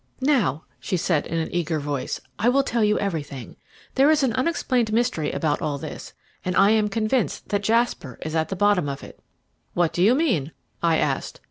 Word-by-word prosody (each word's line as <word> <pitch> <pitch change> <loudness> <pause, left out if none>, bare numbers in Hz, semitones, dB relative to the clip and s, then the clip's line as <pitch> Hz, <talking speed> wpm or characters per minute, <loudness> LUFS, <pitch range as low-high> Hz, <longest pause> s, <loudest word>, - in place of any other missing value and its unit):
"Now," 210 - +2 0.2
she 185 - -2
said 165 -3 0
in 165 - -2
an 160 - -2
eager 165 -2 0
voice, 145 -2 -3 0.2
"I 225 +4 +3
will 275 +2 +3
tell 235 -4 0
you 210 0 +3
everything. 145 - -4 0.4
There 275 +3 +4
is 310 -2 +4
an 250 -4 +2
unexplained 255 -4 0
mystery 215 -10 0
about 150 -2 -1
all 145 -2 -1
this, - - -8 0.3
and 180 0 -2
I 200 +2 +5
am 215 -1 +3
convinced 220 +3 -1
that 205 -1 0
Jasper 220 - 0
is 155 - -4
at 160 -1 0
the 195 - -2
bottom 195 -6 +2
of 140 0 -6
it." - - -12 0.6
"What 175 -2 +2
do 175 - -1
you 220 +7 +5
mean?" 205 - 0 0.3
I 165 -1 +3
asked. - - -1
195 Hz, 200 wpm, -24 LUFS, 155-230 Hz, 0.6 s, I